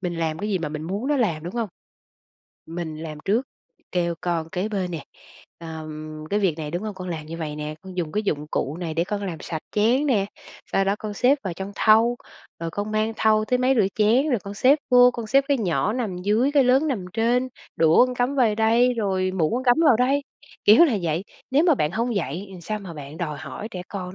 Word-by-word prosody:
mình 180 -2 -3
làm 160 -1 -1
cái 210 - -3
gì 190 - +1
mà 165 - -3
mình 150 +1 -5
muốn 200 +9 -3
nó 295 - +2
làm, 170 -11 0
đúng 175 - -6
hông? 230 -3 -1 1.0
Mình 165 -1 -5
làm 155 -2 -7
trước, 230 +7 +1 0.4
kêu 170 -1 0
con 170 -2 -2
kế 185 +5 -2
bên 195 -4 -2
nè, 165 -4 -5 0.5
ừm: 155 -1 -7
"Cái 205 - +1
việc 175 -5 +1
này, 150 -1 -4
đúng 175 +4 -3
hông? 215 -2 -4
Con 185 -1 -7
làm 155 -3 -5
như 165 - -6
vậy 150 -2 -4
nè, 150 0 -4
con 190 -1 -10
dùng 165 -4 -2
cái 210 - 0
dụng 150 -7 -2
cụ 145 +4 -2
này 165 -3 -4
để 170 - +1
con 205 +2 -3
làm 165 -4 -5
sạch 160 -2 -5
chén 235 +7 +2
nè, 210 -8 +2 0.5
sau 195 - +3
đó 195 +1 +1
con 215 -1 -5
xếp 255 +7 +3
vào 185 - -3
trong 190 +3 -6
thau, 225 +2 +4 0.4
rồi 165 - -3
con 205 +5 -4
mang 215 +1 +1
thau 215 -1 +3
tới 250 +3 +1
máy 255 +1 +3
rửa 210 - +4
chén, 230 +7 +3
rồi 245 - +2
con 200 +2 -8
xếp 265 +8 +4
vô, 250 0 +7
con 235 -2 -6
xếp 275 +4 +4
cái 280 -3 +2
nhỏ 200 +1 0
nằm 230 -7 -2
dưới 215 +9 +1
cái 285 -2 +5
lớn 265 +5 +3
nằm 230 -10 -2
trên, 240 +4 +1 0.3
đũa 165 +9 +5
con 250 - -4
cắm 245 +3 0
vời 240 -6 +3
đây 230 +3 +3
rồi 190 -4 0
muỗng 170 -2 0
con 255 +2 -2
cắm 245 -1 +5
vào 260 -6 +6
đây." 265 +4 +2 0.4
Kiểu 220 +11 +8
là 245 -10 +1
vậy, 165 +3 -1 0.3
nếu 285 +5 +4
mà 335 -4 +5
bạn 150 - 0
hông 235 +3 -1
dạy 175 +3 -3
thì 180 - -10
sao 215 +5 -3
mà 190 -5 -9
bạn 145 0 -9
đòi 150 -4 -4
hỏi 215 - -7
trẻ 180 - -6
con 185 -2 -6
200 Hz, 245 wpm, -24 LUFS, 165-240 Hz, 1.0 s, Kiểu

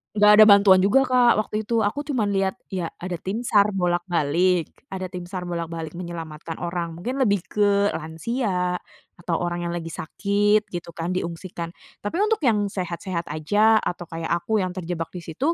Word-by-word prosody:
nggak 210 0 +6
ada 215 - +11
bantuan 200 -2 +7
juga 205 +8 +4
Kak, 250 -2 +4
waktu 215 0 -2
itu. 230 -2 +2
Aku 285 +8 -1
cuman 245 -9 -1
lihat, 195 +2 +1 0.2
ya 180 -3 -2
ada 180 0 -4
tim 215 +6 -4
SAR 205 -1 +4
bolak-balik 175 -1 +1 0.2
ada 190 -1 -4
tim 180 -1 -6
SAR 185 -1 -5
bolak-balik 165 -2 -4
menyelamatkan 165 -2 -7
orang, 170 -1 -3
mungkin 250 +9 -4
lebih 200 -6 +2
ke 205 -1 +2
lansia 180 +2 -2 0.4
atau 170 -1 -1
orang 175 0 -2
yang - - -3
lagi 165 -1 -5
sakit 205 +6 +1
gitu 175 -1 -6
kan, 170 +2 -3
diungsikan. 170 -1 -4 0.3
Tapi 205 - -3
untuk 440 0 +1
yang 210 -5 +3
sehat-sehat 175 -1 -4
aja, 210 +8 +3
atau 175 -1 -4
kayak 165 0 -5
aku 220 +5 0
yang 185 - -2
terjebak 170 -3 -4
di 180 - -6
situ, 270 - -1
185 Hz, 175 wpm, -24 LUFS, 170-205 Hz, 0.4 s, ada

